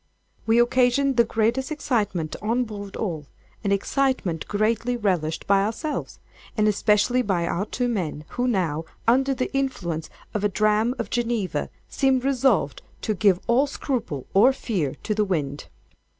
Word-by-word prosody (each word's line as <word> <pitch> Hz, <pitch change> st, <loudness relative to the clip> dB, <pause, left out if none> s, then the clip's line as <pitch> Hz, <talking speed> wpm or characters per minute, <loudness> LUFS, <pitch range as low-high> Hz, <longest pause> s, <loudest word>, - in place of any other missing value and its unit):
We 225 Hz, +1 st, +4 dB
occasioned 255 Hz, +3 st, +3 dB
the 235 Hz, -, +6 dB
greatest 230 Hz, +5 st, 0 dB
excitement 210 Hz, -, -1 dB
on 230 Hz, +4 st, +1 dB
board 205 Hz, -3 st, -7 dB
all—an 180 Hz, +2 st, -5 dB
excitement 200 Hz, -, 0 dB
greatly 230 Hz, +4 st, 0 dB
relished 180 Hz, -8 st, -1 dB
by 195 Hz, 0 st, +4 dB
ourselves, 230 Hz, +9 st, -3 dB, 0.4 s
and 215 Hz, 0 st, +3 dB
especially 210 Hz, +4 st, +3 dB
by 190 Hz, -7 st, 0 dB
our 190 Hz, +5 st, -1 dB
two 245 Hz, +2 st, -1 dB
men, 170 Hz, -9 st, -3 dB
who, 245 Hz, +1 st, -1 dB
now 165 Hz, -9 st, 0 dB, 0.2 s
under 265 Hz, +3 st, +3 dB
the 255 Hz, +2 st, -3 dB
influence 175 Hz, -13 st, -2 dB, 0.2 s
of 210 Hz, -, -2 dB
a 205 Hz, -, +3 dB
dram 215 Hz, +4 st, +2 dB
of 235 Hz, -, -4 dB
Geneva, 235 Hz, -5 st, -1 dB, 0.2 s
seemed 265 Hz, -2 st, +1 dB
resolved 250 Hz, -, +2 dB, 0.2 s
to 215 Hz, -, 0 dB
give 190 Hz, -2 st, +3 dB
all 250 Hz, +5 st, +3 dB
scruple, 240 Hz, -, -3 dB
or 225 Hz, +7 st, +6 dB
fear, 185 Hz, -, -2 dB
to 215 Hz, -, 0 dB
the 210 Hz, 0 st, +1 dB
wind. 150 Hz, -7 st, -2 dB
215 Hz, 150 wpm, -24 LUFS, 190-245 Hz, 0.4 s, the